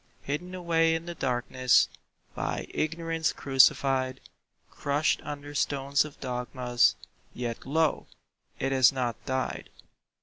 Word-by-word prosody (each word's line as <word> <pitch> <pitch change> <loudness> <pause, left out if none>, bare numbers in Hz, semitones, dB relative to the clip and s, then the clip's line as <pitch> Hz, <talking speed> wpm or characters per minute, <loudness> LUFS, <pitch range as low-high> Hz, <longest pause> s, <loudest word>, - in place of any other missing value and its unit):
Hidden 175 +6 -4
away 165 -2 +2
in 165 +1 -4
the 175 - -5
darkness, 130 -3 +2 0.5
By - - -3
Ignorance 165 0 -1
crucified, 135 -1 +3 0.5
Crushed 145 +2 0
under 145 0 -7
stones 140 0 +1
of 150 - -11
dogmas— 125 -1 +1 0.4
Yet 120 0 -5
lo! 160 +1 +1 0.5
it 135 - -1
has 130 -3 +6
not 125 -4 -3
died. 130 0 -2
140 Hz, 110 wpm, -28 LUFS, 130-160 Hz, 0.5 s, has